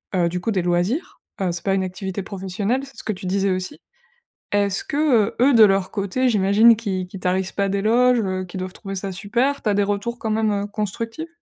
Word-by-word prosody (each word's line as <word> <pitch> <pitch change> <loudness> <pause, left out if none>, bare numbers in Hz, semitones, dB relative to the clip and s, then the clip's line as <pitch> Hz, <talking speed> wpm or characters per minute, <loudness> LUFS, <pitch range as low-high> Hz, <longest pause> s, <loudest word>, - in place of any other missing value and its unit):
heu, 175 -2 +3
du 180 +1 -4
coup 225 - -1
des 190 -3 +1
loisirs. 180 - -1 0.2
Heu, 180 -2 +1
c'est 175 - -5
pas 195 - +2
une 190 - 0
activité 190 +1 -4
professionnelle, 200 +6 -2
c'est 270 - -16
ce - - -6
que 215 - -1
tu 185 - -9
disais 195 +1 +1
aussi. 185 +10 -3 0.7
Est-ce 200 -1 +1
que, 280 - -4
heu, 250 -9 +3
eux 270 +1 +5
de 225 - +7
leur 195 -2 +2
côté, 215 +6 0
j'imagine 210 +2 +5
qu'ils 190 -5 -3
qu'ils 190 0 -9
tarissent 185 +1 0
pas 200 -1 0
d'éloges, 230 +5 +3
heu, 185 -2 -2
qu'ils 180 +1 -7
doivent 185 0 -5
trouver 195 -2 -7
ça 195 0 -4
super, 235 +9 -1
tu 215 - -1
as - - +1
des 205 - +2
retours 205 +4 -2
quand 220 - -3
même, 220 0 +1
heu, 200 0 -1
constructifs? 225 - -4
200 Hz, 230 wpm, -22 LUFS, 190-225 Hz, 0.7 s, de